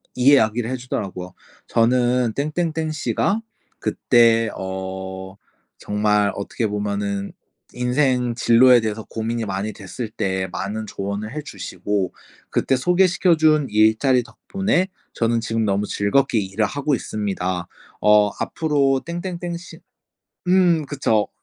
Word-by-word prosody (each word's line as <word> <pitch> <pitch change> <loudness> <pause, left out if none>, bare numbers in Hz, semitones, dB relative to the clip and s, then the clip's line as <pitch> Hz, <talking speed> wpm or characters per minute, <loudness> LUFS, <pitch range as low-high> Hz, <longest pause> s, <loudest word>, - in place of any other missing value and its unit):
이 125 +3 +5
이야기를 110 -2 +3
해주더라고요. 100 -8 -5 0.3
"저는 120 0 +2
땡땡땡 155 +2 -1
씨가 200 +7 0 0.4
그때 115 -2 +3
어 95 0 -6 0.4
정말 105 0 +1
어떻게 105 +3 -2
보면은 100 -1 -2 0.4
인생 125 -1 +1
진로에 120 +1 +5
대해서 110 0 -3
고민이 115 +1 -3
많이 100 +2 -3
됐을 105 +4 -7
때 95 -3 -2
많은 105 +4 -4
조언을 100 +2 -4
해 150 - -4
주시고 95 - -3 0.4
그때 135 - +1
소개시켜 180 +4 +3
준 155 -2 +3
일자리 110 +4 +3
덕분에 185 - -1 0.3
저는 115 0 +1
지금 115 0 -1
너무 100 0 0
즐겁게 110 +5 +1
일을 100 +2 -1
하고 145 +4 -1
있습니다." 95 -6 -3 0.3
어 105 0 +5
"앞으로 140 -4 +1
땡땡땡 175 0 -4
씨" 175 - -12 0.7
음 180 -4 +4
그쵸. 115 -7 0
115 Hz, 265 characters per minute, -21 LUFS, 105-140 Hz, 0.7 s, 이